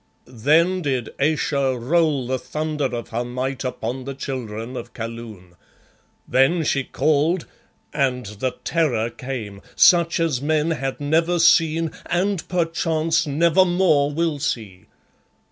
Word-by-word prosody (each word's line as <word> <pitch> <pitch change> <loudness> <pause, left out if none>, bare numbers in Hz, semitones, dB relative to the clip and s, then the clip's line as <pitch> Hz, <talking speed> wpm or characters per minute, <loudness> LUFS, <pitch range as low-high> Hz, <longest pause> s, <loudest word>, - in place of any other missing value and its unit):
Then 155 +10 +2
did 130 -7 -2
Ayesha 140 -3 +1
roll 145 +1 +1
the 130 +1 -2
thunder 155 0 -3
of 120 -3 -4
her 120 +1 -2
might 130 +2 -4
upon 125 0 -4
the 140 0 -5
Children 125 -3 -5
of 120 -1 -8
Kaloon. 115 -6 -8 0.7
Then 140 +6 +3
she 140 -2 0
called, 155 +5 +1 0.5
and 130 -4 0
the 105 +5 -4
Terror 125 -9 0
came, 115 -6 -6
such 170 -2 +5
as 160 -6 0
men 155 +2 +1
had 135 -4 -3
never 165 +4 +1
seen 165 -1 +3 0.2
and 185 +1 -1
perchance 165 -2 0
never 165 +5 +4
more 175 -6 +2
will 160 -1 -1
see. 110 -10 -4
140 Hz, 130 wpm, -22 LUFS, 125-165 Hz, 0.7 s, such